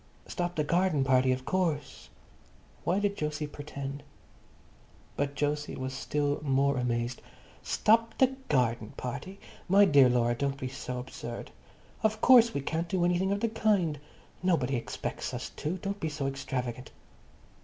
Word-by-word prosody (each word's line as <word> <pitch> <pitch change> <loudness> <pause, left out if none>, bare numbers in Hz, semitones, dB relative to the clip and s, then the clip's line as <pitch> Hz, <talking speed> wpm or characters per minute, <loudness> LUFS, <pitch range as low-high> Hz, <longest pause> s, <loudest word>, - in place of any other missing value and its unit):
"Stop 175 0 -3
the 150 - +1
garden 170 -2 +2
party, 130 -1 +4
of 130 0 -2
course." 170 -6 -1 0.8
Why 180 - +2
did 205 0 0
Jose 150 0 -2
pretend? 140 -1 -6 1.1
But 140 0 -2
Jose 145 0 -1
was 130 0 -4
still 145 +2 -1
more 140 -1 +2
amazed. 120 0 -1 0.4
"Stop 230 +1 +2
the 260 0 +3
garden 120 -6 +1
party? 140 +10 -6 0.3
My 200 +2 +7
dear 140 -6 +6
Laura, 120 -1 +2
don't 140 +3 -1
be 130 - -3
so 125 -1 -5
absurd. 125 -2 -7 0.5
Of 220 0 +1
course 235 -1 +7
we 140 - -2
can't 165 +4 -2
do 180 -1 +1
anything 180 +2 +1
of 200 0 -1
the 230 - +1
kind. 200 -9 +1 0.4
Nobody 160 -8 +1
expects 120 - -4
us - - -5
to. 160 +5 -2
Don't 200 +2 -4
be 160 - -1
so 145 -2 -4
extravagant." 130 -2 -3
145 Hz, 150 wpm, -29 LUFS, 130-185 Hz, 1.1 s, My